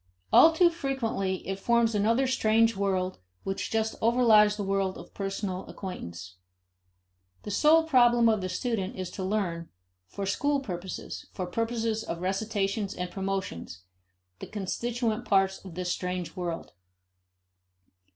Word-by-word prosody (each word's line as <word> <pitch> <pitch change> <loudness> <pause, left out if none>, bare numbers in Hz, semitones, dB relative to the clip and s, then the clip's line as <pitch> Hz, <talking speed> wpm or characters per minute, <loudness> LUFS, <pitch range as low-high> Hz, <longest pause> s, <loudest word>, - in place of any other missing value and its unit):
All 325 - +9
too 340 +1 +4
frequently 230 - -2
it 195 0 -3
forms 235 +1 +2
another 225 +6 +2
strange 230 -2 +3
world 190 -2 -1 0.2
which 195 0 -3
just 220 0 0
overlies 220 -3 +5
the 205 - -2
world 195 -1 0
of - - -12
personal 195 -1 -3
acquaintance. 90 - -8 1.1
The 210 - -5
sole 310 +9 +5
problem 240 -6 +5
of 215 -3 +2
the 185 - -3
student 200 0 -2
is 185 -2 -5
to 190 - -5
learn, 185 -4 -2 0.4
for 200 - -5
school 285 +9 +1
purposes, 185 -7 -6
for 185 - -3
purposes 225 +2 -1
of 170 - -5
recitations 195 +1 -1
and 180 0 -4
promotions, 190 - -4 0.6
the - - -7
constituent 230 +3 -2
parts 195 -3 +2
of 185 -4 -10
this 180 0 -2
strange 180 -1 -3
world. 175 -3 -4
200 Hz, 135 wpm, -28 LUFS, 185-230 Hz, 1.1 s, All